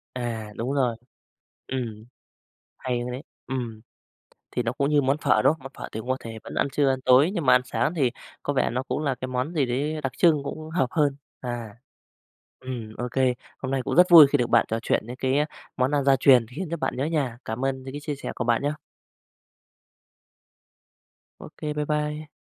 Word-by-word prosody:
À, 115 -4 -4
đúng 125 +4 -2
rồi. 125 -5 +1 0.7
Ừm, 115 -5 -4 0.7
hay 125 -2 -2
đấy! 130 +4 -6 0.2
Ừm, 120 -4 -4 0.7
thì 125 - -1
nó 115 - 0
cũng 140 +1 0
như 150 -1 +4
món 135 +2 +1
phở, - - +3
đúng - - +5
không? 160 - -12
Mà - - -19
món 135 - -8
phở - - -6
thì 110 - -5
cũng 125 - -8
có 130 - +1
thể 115 -1 -8
vẫn - - -9
ăn - - +2
trưa, 145 -2 +2
ăn 130 -1 0
tối 130 +7 +6
nhưng 170 -7 -2
mà 130 - +6
ăn 125 - +5
sáng 155 +5 0
thì 135 -7 +1 0.3
có 145 - -1
vẻ 135 - +2
nó 125 +3 -2
cũng 135 - -3
là 135 -3 0
cái 130 +1 -5
món 130 +5 -2
gì 150 -5 +2
đấy 145 +6 -1
đặc 135 - -1
trưng 155 -5 +4
cũng 155 +2 -6
hợp 160 -6 +1
hơn. 145 -3 +2 0.2
À, 120 -4 -5 0.9
ừm, 120 -4 -6
ô 125 0 -2
kê, 130 -1 +2 0.2
hôm 130 - -4
nay 135 -1 0
cũng - - -2
rất 180 0 +8
vui 160 -4 +11
khi 145 +1 +1
được 120 -2 0
bạn - - +5
trò 115 - -1
chuyện 110 - 0
đến 125 - -7
cái 130 +1 0 0.4
món 130 0 +2
ăn 145 -2 +1
gia 135 -1 +5
truyền 130 -3 +6
khiến 185 -3 -3
cho 170 - -1
bạn 160 - -2
nhớ 130 - 0
nhà. 145 -7 -1
Cảm 110 +4 -3
ơn 130 -1 -1
những 130 - -8
cái 145 - -5
chia 150 0 -3
sẻ - - -5
của 125 - -3
bạn 120 +2 +2
nhé! 145 - +1 2.7
Ô - - -9
kê, 150 -1 -3
bái 150 0 -2
bai! 150 0 -2
130 Hz, 225 wpm, -25 LUFS, 125-145 Hz, 2.7 s, vui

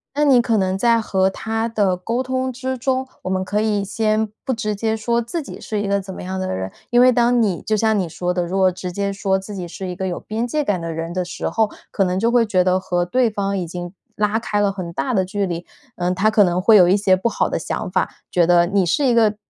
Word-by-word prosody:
那 295 +1 +2
你 265 -4 +6
可 230 -2 +1
能 190 -1 0
在 230 +2 +3
和 190 -3 +1
他 225 +3 -2
的 205 -5 +1
沟 230 +7 -2
通 260 0 -2
之 260 +1 -3
中， 260 +1 -1 0.2
我 - - -3
们 190 0 0
可 205 +3 -1
以 210 -2 0
先 215 +1 0 0.2
不 265 - 0
直 215 -2 -2
接 220 +2 -1
说 235 +2 0
自 235 +9 -3
己 280 - -9
是 210 -2 -3
一 205 - -2
个 200 0 +1
怎 190 0 -8
么 - - -8
样 190 +1 -4
的 185 - -2
人。 95 0 -4 0.2
因 240 0 +5
为 255 0 +7
当 240 0 +3
你 195 -6 0
就 215 - 0
像 220 0 +2
你 185 - 0
说 175 +2 -3
的， 180 -1 -1
如 180 +3 -3
果 185 -1 +4
直 180 0 -6
接 200 +2 -2
说 195 -1 0
自 200 +2 -8
己 180 -2 -5
是 185 +2 -7
一 180 - -5
个 190 0 -3
有 175 - -3
边 220 +2 -3
界 300 +5 -1
感 205 -9 0
的 165 -1 -4
人 165 +1 -4
的 180 0 -1
时 175 - -4
候， 220 -2 +1 0.2
可 195 - 0
能 185 0 0
就 230 +3 +2
会 240 -1 +4
觉 185 -4 +2
得 185 +1 +2
和 175 -1 -1
对 245 +7 +2
方 200 -1 -2
已 180 - -2
经 175 +1 -6 0.2
拉 210 +1 +1
开 210 -2 -1
了 200 -1 +2
很 180 -3 -6
大 255 +7 -1
的 190 -2 +2
距 200 0 -2
离， 170 0 -4 0.3
嗯， 180 0 -1
他 195 +4 +2
可 215 -1 +5
能 180 -1 +1
会 220 +3 +6
有 180 -3 +7
一 185 - +4
些 195 -2 +3
不 185 +5 -1
好 - - 0
的 - - -1
想 - - -4
法， - - 0 0.2
觉 175 -2 +3
得： 175 0 +4
“你 195 -3 +3
是 275 - +1
一 245 - +3
个 215 -2 +4
200 Hz, 300 characters per minute, -20 LUFS, 185-225 Hz, 0.3 s, 为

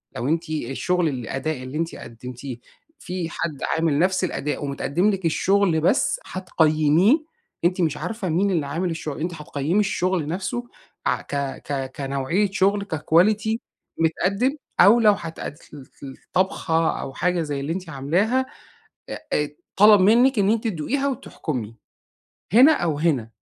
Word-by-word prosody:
لو 125 0 -3
أنتِ 165 +2 -1
الشغل 155 +4 -1
الأداء 130 +2 -4
اللي 130 +3 -6
أنتِ 165 +1 -2
قدّمتيه 125 +2 -8 0.4
في 180 - -4
حد 155 -3 -4 0.2
عامل 160 -3 +1
نفس 185 +2 +2
الأداء، 150 -5 -2
ومتقدّم 140 +7 0
لِك 195 -3 -2
الشغل 180 0 +2
بس 245 - +2
هتقيّميه 175 - +2 0.4
أنتِ 180 +1 +2
مش 155 -3 0
عارفة 215 -1 -4
مين 190 +5 +1
اللي 165 -6 0
عامل 165 +6 -2
الشغل. 155 -3 -5
أنتِ 175 +3 -2
هتقيّمي 150 +3 -1
الشغل 185 -5 0
نفسه 200 +9 -3 0.4
ع - - +1
ك - - -7 0.3
ك 135 -2 -3
كنوعية 140 +9 0
شغل، 200 +1 +2
كquality 205 +8 +2 0.4
متقَدّم، 195 - +1 0.2
أو 205 +6 +7
لو 215 -2 +6
هتقد 165 -5 -6 0.2
ل - - -8 0.3
ل 135 - -7
الطبخة، 165 -3 0
أو 135 - -6
حاجة 180 +2 0
زي 145 -3 -3
اللي 140 +4 -2
أنتِ 180 -2 -6
عاملاها. 180 - +1 0.6
آآ 150 - -2 0.3
طلب 210 0 +7
منِّك 235 +5 +5
إن 200 0 +3
أنتِ 225 0 +1
تدوقيها 230 - -1
وتحكُمي. 130 - -4 0.8
هنا 260 +7 +8
أو 165 - 0
هنا 140 -9 +1
170 Hz, 145 wpm, -23 LUFS, 150-200 Hz, 0.8 s, هنا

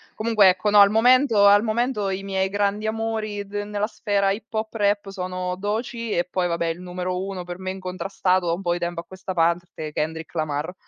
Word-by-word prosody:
Comunque 215 -3 +4
ecco 195 +3 +1
no, 205 - +7
al 200 0 +8
momento 230 -1 +4
al 205 0 +7
momento 220 -2 0
i 190 +1 -3
miei 190 -1 -1
grandi 205 +2 0
amori 220 -2 -3
d 200 - -18
nella 205 0 -2
sfera 200 -3 0
hip 215 +3 -6
hop 220 -1 -3
rap 205 -2 0
sono 185 -1 -4
Doechii 220 +3 -3
e 175 - +1
poi 180 -1 0
vabbè 170 -1 -1
il 165 +2 -3
numero 180 0 -3
uno, 195 -2 -5
per 175 +1 -8
me 185 - -4
incontrastato 185 -1 -1
da 170 - +2
un 180 - -4
po' 175 -1 +1
di 175 - -3
tempo 175 -1 -3
a - - -19
questa 185 +1 -7
parte, 170 -2 -1
Kendrick 160 +2 -4
Lamar, 155 +1 -2
195 Hz, 210 wpm, -23 LUFS, 180-210 Hz, -, al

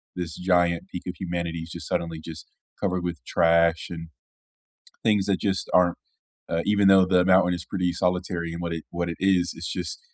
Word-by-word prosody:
This 85 -2 -4
giant 90 -1 +1
peak 90 - -6
of 90 - -4
humanity 85 -2 -3
is 80 0 -8
just - - -7
suddenly 85 -1 -2
just 80 -1 -8 0.3
covered 90 -2 -1
with 85 -7 -4
trash 85 0 +3
and 80 -1 -7 0.9
things 105 -3 +3
that 100 -2 +1
just 95 -2 -1
aren't 90 -1 +4 0.5
uh, 85 0 0
even 100 -1 +3
though 95 -1 +7
the 90 -1 +3
mountain 95 -1 +4
is 85 -1 -4
pretty 90 -3 -1
solitary 90 -1 -1
in 85 - -6
what 85 -1 -3
it 80 -1 -5
what 85 0 -3
it 85 - -5
is, 95 -2 +2
it's - - -5
just - - -4
90 Hz, 195 wpm, -25 LUFS, 85-95 Hz, 0.9 s, though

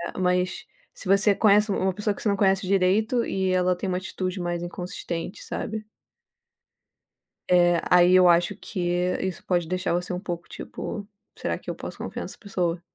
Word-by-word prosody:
eh. - - -5
Mas, 180 0 0 0.3
se - - -8
você 200 +1 +5
conhece 210 0 +4
u - - 0
uma 190 0 +1
pessoa 210 +1 -1
que - - -10
você 215 - 0
não 200 - +2
conhece 195 -1 +2
direito 200 +5 +2
e 190 -1 0
ela 185 0 +2
tem 190 - -4
uma 180 0 0
atitude 185 0 -4
mais 175 0 -2
inconsistente, 175 0 -5
sabe. 215 0 -4 1.6
É, 175 -1 +4
aí 180 0 +6
eu 185 -1 +7
acho 175 +3 +3
que 200 -2 -7 0.4
isso 190 -1 -4
pode 175 -3 +1
deixar 185 0 -1
você 180 +1 -2
um 180 - -2
pouco, 175 -3 -5
tipo: 205 -1 -6 0.3
"Será - - -2
que - - -10
eu - - -3
posso - - -8
confiar - - -5
nessa - - -8
pessoa?" 180 -4 -2
185 Hz, 185 wpm, -25 LUFS, 175-200 Hz, 1.6 s, eu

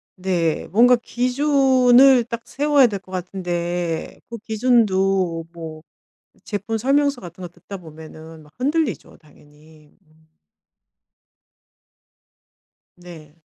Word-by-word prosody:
네 180 -4 -1
뭔가 245 +3 +6
기준을 255 0 +3
딱 235 0 -6
세워야 290 -1 +3
될 200 -3 -5
것 185 0 -19
같은데 175 -2 -4
그 235 - -6
기준도 195 -7 +1
뭐 160 -2 -9 0.6
제품 210 +2 -3
설명서 280 +3 +1
같은 175 +1 -11
거 180 - -6
듣다 175 +3 -11
보면은 160 -1 -13
막 150 +1 -21
흔들리죠 275 - -2
당연히. 150 0 -22
음. 160 -2 -30 2.7
네. 165 -3 -14
190 Hz, 190 characters per minute, -21 LUFS, 165-245 Hz, 2.7 s, 뭔가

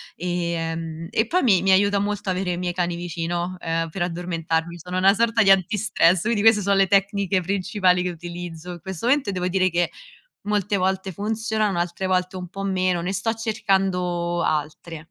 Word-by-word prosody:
ehm, 165 -2 -3
e 220 - +1
poi 360 +5 +1
mi 195 -8 +4
mi 190 +1 +3
aiuta 200 +1 +4
molto 205 -1 -2
avere 180 -1 -1
i - - -4
miei 175 0 -2
cani 175 -1 -1
vicino, 175 +1 -3
ehm, 165 0 -2
per 175 +3 -6
addormentarmi. 170 -1 -2
Sono 180 +2 -5
una 190 +1 +5
sorta 225 0 +2
di 195 - +6
antistress, 190 -2 +3
quindi 220 -2 0
queste 220 -1 +5
so 200 +1 +1
le 195 -1 +4
tecniche 195 -1 +2
principali 185 0 +1
che 180 - -1
utilizzo 175 0 -7
in 175 - -8
questo 190 +4 -5
momento 270 -3 +2
e - - -2
devo 180 -1 -1
dire 185 0 +2
che 175 0 0 0.5
molte 205 0 0
volte 190 +1 -1
funzionano, 215 0 -1
altre 175 +2 -2
volte 185 0 0
un 180 - -6
po' 195 +3 -7
meno. 185 -2 0
Ne 180 +2 -2
sto 215 +4 -1
cercando 190 -6 0
altre. 155 +1 -3
185 Hz, 185 wpm, -23 LUFS, 175-200 Hz, 0.5 s, di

